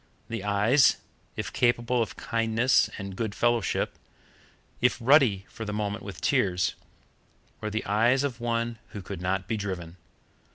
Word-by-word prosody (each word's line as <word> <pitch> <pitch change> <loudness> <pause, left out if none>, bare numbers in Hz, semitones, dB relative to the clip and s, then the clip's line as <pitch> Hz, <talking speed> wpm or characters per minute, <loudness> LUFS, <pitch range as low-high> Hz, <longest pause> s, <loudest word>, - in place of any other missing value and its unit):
The 115 -4 -4
eyes, 105 +7 +4 0.4
if 105 -1 -4
capable 120 0 +2
of 115 - -3
kindness 115 +2 +2
and 95 -2 -6
goodfellowship, 115 0 0 0.8
if 125 0 +3
ruddy 120 -7 +4
for 115 - -8
the 105 -1 -4
moment 105 -1 -3
with 100 -3 -8
tears, 90 0 +1 0.9
were 105 - -3
the 110 +1 -3
eyes 120 +6 +3
of 130 -4 -3
one 115 -1 -1
who 100 - -6
could 95 -1 -7
not 95 +1 -1
be 110 - -1
driven. 90 -4 -5
110 Hz, 140 wpm, -27 LUFS, 100-120 Hz, 0.9 s, eyes